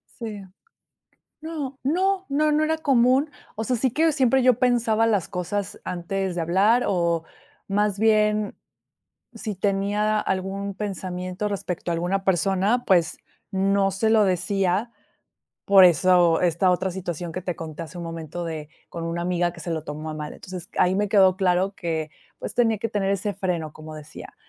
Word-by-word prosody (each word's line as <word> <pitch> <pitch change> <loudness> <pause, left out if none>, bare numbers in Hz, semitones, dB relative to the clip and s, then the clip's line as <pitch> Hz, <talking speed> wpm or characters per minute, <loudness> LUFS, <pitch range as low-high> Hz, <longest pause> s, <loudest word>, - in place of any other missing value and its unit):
Sí. 215 -4 -6 1.0
No, 300 -5 -5
no, 375 +7 +1
no, 300 +2 +2
no 300 +1 +2
era 320 +1 +1
común, 270 0 +3 0.2
o 220 - -3
sea, 250 +3 0
sí 255 +3 +1
que 315 +6 +2
siempre 265 -2 +3
yo 250 -2 +4
pensaba 230 -3 +2
las 205 -6 +1
cosas 190 +2 -4
antes 180 +1 -3
de 170 - -1
hablar 200 +9 +3
o, 170 -3 +1 0.4
más 205 0 +1
bien, 215 -1 +2 0.8
si 215 -3 -4
tenía 205 +2 0
algún 195 +1 -2
pensamiento 185 -1 -4
respecto 180 -3 -3
a - - +1
alguna 180 +3 -1
persona, 195 +6 +1
pues 175 -3 +2 0.3
no 195 0 +2
se 220 +4 0
lo 220 -1 +5
decía, 195 +3 0 0.7
por 195 -1 +7
eso 175 -1 +5
esta 180 +1 +3
otra 185 +1 -1
situación 175 -2 -5
que 185 +2 -5
te 180 -2 -3
conté 160 0 -7
hace 165 - -12
un 175 - -5
momento 165 +1 -6
de 155 -3 -5 0.2
con 170 -1 -6
una 170 +1 -3
amiga 175 -1 0
que 170 - -12
se 170 - -5
lo 160 -2 -3
tomó 155 +1 -6
a - - -5
mal, 150 -1 -6
entonces 185 -1 -9
ahí 180 +1 +3
me 205 +1 0
quedó 190 -2 +5
claro 190 +1 +1
que, 160 -2 -3 0.3
pues, - - -5
tenía 225 -3 +3
que 230 - -2
tener 200 -2 0
ese 200 +1 -2
freno, 175 -6 -2
como 155 0 -10
decía, 155 0 -11
195 Hz, 170 wpm, -24 LUFS, 175-215 Hz, 1.0 s, por